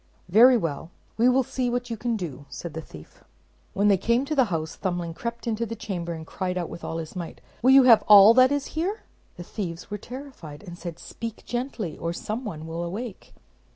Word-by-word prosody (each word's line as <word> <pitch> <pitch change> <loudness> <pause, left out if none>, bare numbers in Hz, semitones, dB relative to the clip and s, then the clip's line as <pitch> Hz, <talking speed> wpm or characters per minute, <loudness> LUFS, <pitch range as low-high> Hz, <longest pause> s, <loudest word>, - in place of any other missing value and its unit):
"Very 240 +7 +7
well; 165 -5 -3 0.3
we 240 +3 +4
will 260 +1 +3
see 250 0 -2
what 245 0 -2
you - - -1
can 230 +1 -2
do," 145 -7 -7
said 170 -3 -7
the 160 - -5
thief. 80 - -14 0.5
When 200 +1 +2
they 200 -2 +5
came 235 +7 +1
to 305 - -2
the 270 -4 +4
house, 160 -5 -3
Thumbling 175 -3 -3
crept 235 +5 -6
into 230 -1 -1
the 230 0 -4
chamber, 180 -6 -4
and 160 -1 -8
cried 180 +2 -3
out 175 -2 -3
with 170 - -9
all 165 - -4
his 160 +1 -7
might, 175 -3 -6 0.2
"Will 255 - +4
you 270 0 +8
have 235 -3 +7
all 210 +1 +9
that 255 +2 +6
is 285 -1 0
here?" 365 +7 -2 0.4
The 175 - -7
thieves 175 -2 -6
were 205 - -4
terrified, 245 - -10
and 175 -4 -9
said, 170 -2 -7
"Speak 230 +4 -8
gently, 240 - -4
or 165 +1 -2
some 215 +7 -4
one 160 -6 -6
will 165 +1 -5
awake." 200 +5 -7
205 Hz, 220 wpm, -25 LUFS, 170-245 Hz, 0.5 s, all